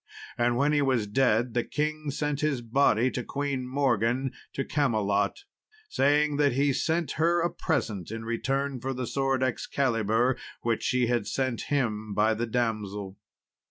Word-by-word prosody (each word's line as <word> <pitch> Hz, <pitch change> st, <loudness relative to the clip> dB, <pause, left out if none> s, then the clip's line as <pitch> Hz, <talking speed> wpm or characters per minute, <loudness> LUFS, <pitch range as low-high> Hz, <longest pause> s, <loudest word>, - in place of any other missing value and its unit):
And 120 Hz, 0 st, +1 dB
when 145 Hz, +3 st, +2 dB
he 145 Hz, -, +3 dB
was 130 Hz, -6 st, +1 dB
dead, 115 Hz, +1 st, +2 dB
the 120 Hz, 0 st, +1 dB
king 155 Hz, 0 st, -2 dB
sent 145 Hz, 0 st, -2 dB
his 140 Hz, -5 st, 0 dB
body 120 Hz, 0 st, +3 dB
to 125 Hz, -, -3 dB
Queen 140 Hz, -1 st, -3 dB
Morgan, 130 Hz, -1 st, +1 dB, 0.2 s
to 135 Hz, -, -2 dB
Camelot, 105 Hz, -, 0 dB, 0.5 s
saying 145 Hz, +1 st, +2 dB
that 145 Hz, -2 st, +3 dB
he 140 Hz, +2 st, +2 dB
sent 160 Hz, +1 st, 0 dB
her 170 Hz, +1 st, +3 dB
a 170 Hz, 0 st, +1 dB
present 110 Hz, -, -2 dB
in 115 Hz, +1 st, -6 dB
return 135 Hz, +4 st, -1 dB
for 135 Hz, +2 st, -3 dB
the 125 Hz, 0 st, -3 dB
sword 135 Hz, +1 st, 0 dB
Excalibur 120 Hz, -2 st, +1 dB, 0.3 s
which 115 Hz, -2 st, 0 dB
she 125 Hz, -1 st, +1 dB
had 120 Hz, -3 st, 0 dB
sent 130 Hz, -2 st, -2 dB
him 110 Hz, -7 st, -1 dB
by 110 Hz, +2 st, +3 dB
the 115 Hz, +2 st, -2 dB
damsel. 105 Hz, -4 st, -2 dB
125 Hz, 160 wpm, -27 LUFS, 115-140 Hz, 0.5 s, he